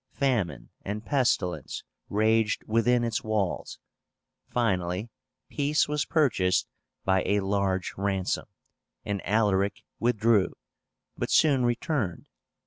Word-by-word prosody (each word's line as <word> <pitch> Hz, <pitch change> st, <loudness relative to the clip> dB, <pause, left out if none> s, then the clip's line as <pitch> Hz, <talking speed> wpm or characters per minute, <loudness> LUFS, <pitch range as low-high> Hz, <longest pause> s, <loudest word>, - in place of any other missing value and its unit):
Famine 115 Hz, -, -1 dB
and 105 Hz, +2 st, -4 dB
pestilence 120 Hz, -10 st, 0 dB, 0.3 s
raged 110 Hz, +1 st, +2 dB
within 120 Hz, +2 st, +2 dB
its 115 Hz, -2 st, -1 dB
walls. 105 Hz, -4 st, -2 dB, 0.7 s
Finally 95 Hz, -2 st, -1 dB, 0.4 s
peace 145 Hz, +1 st, +1 dB
was 150 Hz, 0 st, 0 dB
purchased 105 Hz, -, +2 dB, 0.4 s
by 95 Hz, -1 st, +3 dB
a 100 Hz, 0 st, +1 dB
large 95 Hz, -1 st, 0 dB
ransom, 95 Hz, -1 st, -1 dB, 0.6 s
and 100 Hz, -2 st, -2 dB
Alaric 100 Hz, -1 st, +1 dB, 0.2 s
withdrew, 115 Hz, -3 st, +2 dB, 0.6 s
but -, -, -3 dB
soon 140 Hz, -5 st, +4 dB
returned. 120 Hz, -, -1 dB
105 Hz, 100 wpm, -27 LUFS, 95-120 Hz, 0.7 s, soon